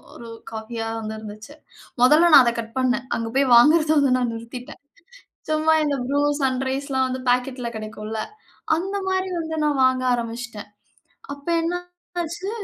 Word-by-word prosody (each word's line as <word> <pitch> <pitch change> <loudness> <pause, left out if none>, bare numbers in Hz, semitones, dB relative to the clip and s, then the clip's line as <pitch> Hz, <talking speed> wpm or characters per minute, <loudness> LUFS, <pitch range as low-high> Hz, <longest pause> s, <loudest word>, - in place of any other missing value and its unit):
ஒரு 235 - -10 0.2
காஃபியா 225 +1 -5
வந்து 220 0 -5
இருந்துச்சு. 215 +6 -10 0.5
மொதல்ல 310 +6 +6
நான் - - +9
அத 235 - +2
கட் 225 +1 -13
பண்னே. 255 0 +1 0.2
அங்க 230 - -3
போய் 275 -2 +2
வாங்குறத 305 +5 +5
வந்து 270 -3 +3
நான் 240 -2 -1
நிறுத்திட்டேன் 235 +4 -9 0.7
சும்மா 310 +1 +3
இந்த 290 -2 0
Bru, 280 +2 0 0.2
Sunriseலாம் 265 0 -1
வந்து 255 0 -4
பாக்கெட்ல 250 0 0
கிடைக்கும்ல. 215 0 -5 0.5
அந்தமாரி 380 +1 -2
வந்து 320 -1 -4
நான் 290 -2 0
வாங்க 260 0 +2
ஆரம்பிச்சிட்டேன். 230 -2 -5 0.6
அப்ப 285 +1 -14
என்ன 335 +2 -1 0.5
ஆச்சு 345 +4 -5
260 Hz, 140 wpm, -22 LUFS, 230-300 Hz, 0.7 s, நான்